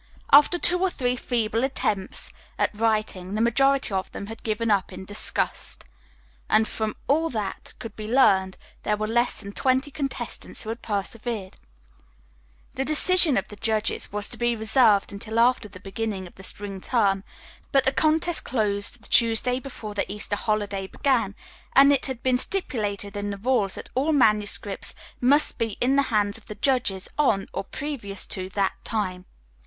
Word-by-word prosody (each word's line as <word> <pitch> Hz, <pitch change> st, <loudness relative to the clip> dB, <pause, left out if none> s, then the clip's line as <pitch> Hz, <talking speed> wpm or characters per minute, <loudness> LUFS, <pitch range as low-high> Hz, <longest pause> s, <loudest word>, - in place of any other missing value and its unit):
After 295 Hz, +5 st, +7 dB
two 360 Hz, +1 st, +3 dB
or 380 Hz, +1 st, +2 dB
three 250 Hz, -7 st, -1 dB
feeble 230 Hz, -2 st, -1 dB
attempts 210 Hz, -7 st, -2 dB, 0.3 s
at -, -, 0 dB
writing, 215 Hz, -3 st, -1 dB
the -, -, -1 dB
majority 270 Hz, +1 st, +2 dB
of 190 Hz, -1 st, -2 dB
them -, -, -6 dB
had 225 Hz, +2 st, -9 dB
given 220 Hz, 0 st, -1 dB
up 195 Hz, -2 st, +1 dB
in 190 Hz, -, -8 dB
disgust, 205 Hz, +1 st, -3 dB, 0.7 s
and 220 Hz, 0 st, +4 dB
from 220 Hz, -1 st, -3 dB
all 320 Hz, +4 st, +2 dB
that 215 Hz, -6 st, -4 dB
could 225 Hz, -3 st, -8 dB
be 215 Hz, -1 st, -6 dB
learned 190 Hz, -7 st, +4 dB, 0.2 s
there 210 Hz, -, 0 dB
were 215 Hz, -, -1 dB
less 240 Hz, +3 st, +1 dB
than 200 Hz, -, -8 dB
twenty 260 Hz, +5 st, 0 dB
contestants 270 Hz, -4 st, -5 dB
who 220 Hz, -, -7 dB
had 230 Hz, +1 st, -5 dB
persevered. 210 Hz, -1 st, -4 dB, 1.2 s
The 265 Hz, -, -1 dB
decision 310 Hz, +1 st, +5 dB
of 195 Hz, -, -2 dB
the 210 Hz, -, -9 dB
judges 220 Hz, +1 st, 0 dB
was 205 Hz, 0 st, +1 dB
to -, -, -5 dB
be 240 Hz, 0 st, +1 dB
reserved 220 Hz, -2 st, +3 dB
until 220 Hz, +3 st, -5 dB
after 235 Hz, -2 st, +3 dB
the 185 Hz, -, -12 dB
beginning 195 Hz, 0 st, -4 dB
of 175 Hz, -, -13 dB
the -, -, -13 dB
spring 195 Hz, 0 st, -2 dB
term, 195 Hz, -5 st, +1 dB, 0.5 s
but 275 Hz, -1 st, +3 dB
the 265 Hz, -, +4 dB
contest 320 Hz, +2 st, +1 dB
closed 210 Hz, -1 st, -1 dB
the -, -, -7 dB
Tuesday 235 Hz, +2 st, +3 dB
before 240 Hz, -6 st, -8 dB
the 205 Hz, -, -2 dB
Easter 205 Hz, 0 st, -2 dB
holiday 205 Hz, -2 st, -2 dB
began, 230 Hz, -5 st, 0 dB, 0.4 s
and 275 Hz, +1 st, +8 dB
it 275 Hz, -, +1 dB
had 260 Hz, -3 st, -6 dB
been 255 Hz, -1 st, +2 dB
stipulated 210 Hz, -, -2 dB
in 205 Hz, 0 st, -3 dB
the 200 Hz, -, -4 dB
rules 210 Hz, -3 st, +1 dB
that -, -, -9 dB
all 285 Hz, +5 st, +1 dB
manuscripts 210 Hz, -5 st, +1 dB, 0.2 s
must 280 Hz, +5 st, +3 dB
be 225 Hz, -3 st, -2 dB
in 260 Hz, +3 st, +2 dB
the 280 Hz, -, +5 dB
hands 210 Hz, -1 st, +1 dB
of -, -, -24 dB
the 210 Hz, -, -7 dB
judges 215 Hz, -5 st, 0 dB
on, 215 Hz, -10 st, +2 dB
or -, -, -3 dB
previous 225 Hz, -6 st, -5 dB
to, 185 Hz, 0 st, -4 dB
that 195 Hz, 0 st, 0 dB
time. 185 Hz, -5 st, -2 dB
220 Hz, 175 wpm, -25 LUFS, 200-255 Hz, 1.2 s, and